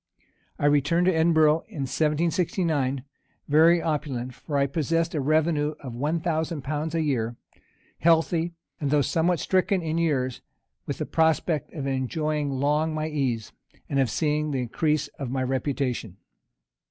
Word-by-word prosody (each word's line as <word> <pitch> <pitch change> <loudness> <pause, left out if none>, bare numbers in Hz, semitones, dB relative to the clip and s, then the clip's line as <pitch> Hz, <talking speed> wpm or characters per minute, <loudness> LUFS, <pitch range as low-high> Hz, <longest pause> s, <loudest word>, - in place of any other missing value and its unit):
I - - -1
returned 145 +4 +3
to 185 - +4
Edinburgh 160 -1 +4
in 145 - -6
1769, 155 -2 0 0.4
very 160 +3 +5
opulent, 135 -5 -2
(for 145 +3 -4
I 140 - +3
possessed 165 +4 0
a 150 - 0
revenue 155 +1 +1
of 130 -4 -7
one 150 +7 -1
thousand 160 -2 -2
pounds 155 +3 -3
a 165 - +1
year,) 120 -6 -1 0.6
healthy, 165 +1 +2 0.2
and 145 - -1
though 145 0 +3
somewhat 170 +4 +1
stricken 185 0 +1
in 160 +1 -1
years, 130 -7 0 0.5
with - - -3
the - - -2
prospect 160 -1 +1
of 145 -4 -4
enjoying 145 +3 -1
long 150 +4 0
my 155 0 -2
ease, 130 -7 -2 0.4
and 140 - 0
of 130 -3 +2
seeing 150 +3 0
the 135 -3 -1
increase 150 +5 0
of 135 -3 -3
my 130 +1 -1
reputation. 130 - -2
150 Hz, 150 wpm, -26 LUFS, 135-160 Hz, 0.6 s, very